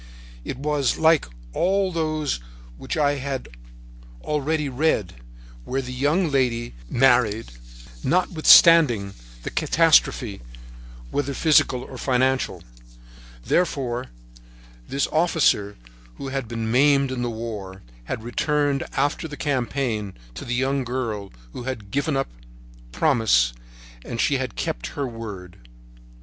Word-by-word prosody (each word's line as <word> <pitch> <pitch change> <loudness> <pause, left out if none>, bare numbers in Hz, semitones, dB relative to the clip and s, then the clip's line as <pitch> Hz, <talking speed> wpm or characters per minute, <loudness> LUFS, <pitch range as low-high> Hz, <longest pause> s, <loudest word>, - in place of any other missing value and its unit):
It - - -5
was 145 -1 0
like 160 -1 +4 0.3
all 190 - +1
those 155 - -1 0.4
which 60 - -5
I 145 -1 +2
had 135 -1 -4 0.8
already 150 0 -1
read, 130 - 0 0.5
where 130 - -2
the 125 0 -6
young 150 +6 +1
lady 120 -3 0 0.2
married 120 - +3 0.5
notwithstanding 160 - +5 0.3
the - - -4
catastrophe, 150 -9 +3 0.7
whether 140 -1 -2
physical 135 -5 +3
or 130 - -10
financial; 130 +1 0 0.8
therefore, 130 -8 0 0.8
this 140 - 0
officer 155 -11 +2 0.4
who 135 - -6
had 135 -3 -3
been 115 -1 -3
maimed 140 +1 +4
in 130 -1 -3
the 120 - -1
war 105 -5 -6 0.2
had 110 - -4
returned, 145 +3 0
after 145 +3 0
the 145 -1 -9
campaign, 125 -7 -2 0.2
to - - -8
the 120 - -2
young 135 +2 0
girl 115 -6 -4 0.2
who 120 - -7
had 110 -7 -5
given 140 +1 0
him 135 - +2
her - - -22
promise, 60 - +3 0.5
and 115 - -6
she 140 - +2
had 130 -1 -4
kept - - -3
her 140 - -1
word. 105 -7 -8
130 Hz, 120 wpm, -23 LUFS, 115-145 Hz, 0.8 s, notwithstanding